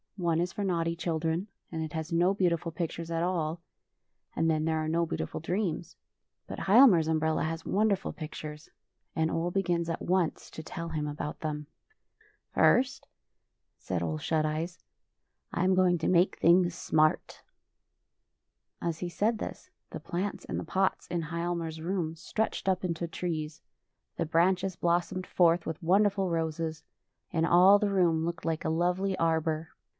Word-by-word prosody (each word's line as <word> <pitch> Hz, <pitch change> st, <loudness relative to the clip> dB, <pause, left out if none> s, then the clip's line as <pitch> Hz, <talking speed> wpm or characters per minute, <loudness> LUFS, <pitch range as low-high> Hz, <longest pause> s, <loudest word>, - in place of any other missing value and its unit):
One 170 Hz, -3 st, +1 dB
is 175 Hz, +1 st, -1 dB
for 205 Hz, -, -3 dB
naughty 170 Hz, -3 st, 0 dB
children, 165 Hz, +2 st, -1 dB, 0.2 s
and 160 Hz, -2 st, -3 dB
it 155 Hz, -, -6 dB
has 160 Hz, 0 st, -4 dB
no 175 Hz, +3 st, +3 dB
beautiful 170 Hz, -3 st, 0 dB
pictures 165 Hz, 0 st, -4 dB
at 165 Hz, 0 st, -1 dB
all, 170 Hz, -2 st, -1 dB, 0.8 s
and 165 Hz, 0 st, +2 dB
then 155 Hz, -1 st, +1 dB
there 160 Hz, 0 st, +1 dB
are 155 Hz, 0 st, -1 dB
no 165 Hz, +2 st, +1 dB
beautiful 165 Hz, -, -4 dB
dreams. 175 Hz, 0 st, -2 dB, 0.5 s
But -, -, -6 dB
Hial 235 Hz, +8 st, +8 dB
mar's 165 Hz, -8 st, +4 dB
umbrella 160 Hz, 0 st, +1 dB
has 160 Hz, +1 st, -3 dB
wonderful 200 Hz, -1 st, +1 dB
pictures, 150 Hz, -1 st, -8 dB, 0.5 s
and 160 Hz, 0 st, +1 dB
Ole 165 Hz, +2 st, 0 dB
begins 175 Hz, -2 st, 0 dB
at 165 Hz, -, -3 dB
once 180 Hz, -2 st, 0 dB
to -, -, -7 dB
tell 165 Hz, +1 st, -6 dB
him 155 Hz, -2 st, -2 dB
about 150 Hz, 0 st, -5 dB
.them. 150 Hz, -1 st, -4 dB, 0.5 s
" 420 Hz, -1 st, -35 dB
First," 270 Hz, +2 st, +3 dB, 0.7 s
said 90 Hz, -2 st, -2 dB
Ole 80 Hz, -2 st, -2 dB
Shut 155 Hz, -, 0 dB
Eyes, 160 Hz, +3 st, -3 dB, 0.4 s
'' -, -, -52 dB
I 170 Hz, -, 0 dB
am 185 Hz, +1 st, +4 dB
going 185 Hz, -1 st, +4 dB
to 160 Hz, -, -1 dB
make 180 Hz, +1 st, +3 dB
things 175 Hz, 0 st, +4 dB
smart." 155 Hz, -3 st, +1 dB, 1.4 s
As 165 Hz, -2 st, -2 dB
he 175 Hz, -, -3 dB
said 220 Hz, +6 st, 0 dB
thisj -, -, -7 dB, 0.2 s
the -, -, -6 dB
plants 190 Hz, +4 st, -4 dB
in -, -, -4 dB
the -, -, -3 dB
pots 190 Hz, 0 st, 0 dB
in 170 Hz, -1 st, -2 dB
Hialmar's 170 Hz, -1 st, -3 dB
room 170 Hz, -2 st, -2 dB
stretched 195 Hz, +4 st, -2 dB
up 185 Hz, 0 st, 0 dB
into 170 Hz, -1 st, -2 dB
trees: 160 Hz, -2 st, -4 dB, 0.6 s
the 165 Hz, -, 0 dB
branches 185 Hz, +3 st, +2 dB
blos 175 Hz, 0 st, +1 dB
somed 185 Hz, -1 st, -4 dB
forth 170 Hz, -1 st, +3 dB
with 160 Hz, +2 st, -4 dB
wonderful 195 Hz, +2 st, +3 dB
roses, 160 Hz, -1 st, -2 dB, 0.5 s
and 165 Hz, -2 st, +1 dB
all 180 Hz, +4 st, +7 dB
the 210 Hz, -1 st, +1 dB
room 170 Hz, -4 st, +2 dB
looked 170 Hz, 0 st, -4 dB
like 165 Hz, -1 st, -2 dB
a -, -, +1 dB
lovely 180 Hz, +4 st, 0 dB
arbor. 160 Hz, -1 st, 0 dB
170 Hz, 170 wpm, -29 LUFS, 160-185 Hz, 1.4 s, Hial